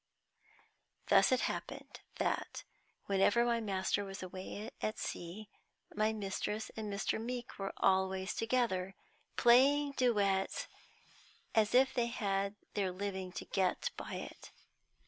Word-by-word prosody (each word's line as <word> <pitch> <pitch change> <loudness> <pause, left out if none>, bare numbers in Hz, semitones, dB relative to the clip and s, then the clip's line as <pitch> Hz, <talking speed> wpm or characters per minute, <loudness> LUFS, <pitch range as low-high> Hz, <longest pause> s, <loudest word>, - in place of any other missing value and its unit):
Thus - - +6
it 255 - +3
happened - - -4 0.2
that, - - -2 0.4
whenever 200 +4 +3
my 235 -1 +2
master 200 -2 0
was 195 -1 -7
away 190 +3 -6
at 215 - -1
sea, 180 +5 -5 0.5
my 215 +1 +2
mistress 210 +1 -3
and 215 -2 -4
Mr. 200 +2 -1
Meeke 245 -1 -5
were 195 0 -2
always 190 0 +2
together, 225 -6 0 0.4
playing 275 +4 +5
duets 205 -8 +1 0.9
as 220 0 +3
if 265 +1 +5
they 240 -2 +1
had 200 -4 -1 0.2
their 195 -2 0
living 190 -1 -4
to - - -5
get 190 -2 0
by - - -6
it. - - -8
205 Hz, 125 wpm, -34 LUFS, 190-235 Hz, 0.9 s, Thus